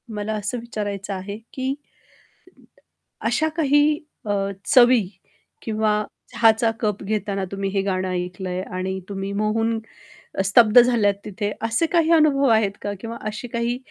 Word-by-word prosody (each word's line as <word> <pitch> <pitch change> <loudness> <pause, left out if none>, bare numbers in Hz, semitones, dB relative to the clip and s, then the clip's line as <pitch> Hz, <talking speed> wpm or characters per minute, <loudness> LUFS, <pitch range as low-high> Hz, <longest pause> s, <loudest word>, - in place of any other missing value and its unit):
मला 210 +1 -3
असं 210 +3 -3
विचारायचं 205 -4 -4
आहे? 195 +2 -5 0.2
की 265 +1 -2 1.5
अशा 305 +7 +1
काही 295 -1 +3 0.3
अ, 205 - 0 0.3
चवी 245 -5 +6 0.6
किंवा 220 -1 0 0.4
चहाचा 225 0 +4
कप 210 -2 -1
घेताना 200 -1 -2
तुम्ही 195 0 -2
हे 195 0 0
गाणं 185 -1 -1
ऐकलं 180 +1 -4
आहे 180 0 -2 0.2
आणि 190 +1 -2
तुम्ही 195 0 -4
मोहून 225 +2 0 0.6
अ, - - +1
स्तब्ध 215 +3 +6
झाल्यात 235 -4 +3
तिथे, 205 +1 -3
असे 230 +8 +1
काही 330 -1 +2
अनुभव 295 -4 +4
आहेत 220 -3 +3
का? 205 - -3
किंवा 230 0 -6
असे 215 +3 -6
काही 235 +1 -1
215 Hz, 140 wpm, -22 LUFS, 200-240 Hz, 1.5 s, चवी